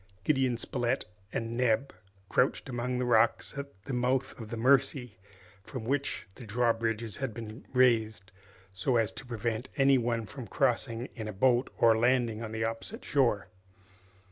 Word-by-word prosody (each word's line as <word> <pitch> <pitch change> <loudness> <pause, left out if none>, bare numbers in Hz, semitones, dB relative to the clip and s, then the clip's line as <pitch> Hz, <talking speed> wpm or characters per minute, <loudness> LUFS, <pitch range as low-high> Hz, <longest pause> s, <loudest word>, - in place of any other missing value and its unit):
Gideon 130 -1 +2
Spilett 120 +1 -1 0.3
and 115 0 -3
Neb 125 +2 +1 0.3
crouched 125 +6 +1
among 125 0 -2
the 125 - 0
rocks 115 +1 +3
at 140 -9 -8
the 135 - -5
mouth 125 +2 0
of 110 -2 -7
the 115 - -4
Mercy, 130 -3 +2 0.4
from 130 +2 -6
which 140 +4 -1
the 125 - -11
drawbridges 115 -1 0
had 130 -5 -3
been 110 +1 -8
raised, 110 -6 +2 0.4
so 120 +7 0
as 115 -3 +2
to 135 - -8
prevent 115 +1 -3
any 135 -1 +5
one 115 -1 -1
from 125 +2 -8
crossing 120 -2 0
in 110 -4 -5
a - - -3
boat 125 +5 +3
or 115 -1 +5
landing 120 -1 +2
on 110 -2 -5
the 110 0 -2
opposite 115 - -4
shore. 120 -8 +2
120 Hz, 160 wpm, -30 LUFS, 110-130 Hz, 0.4 s, any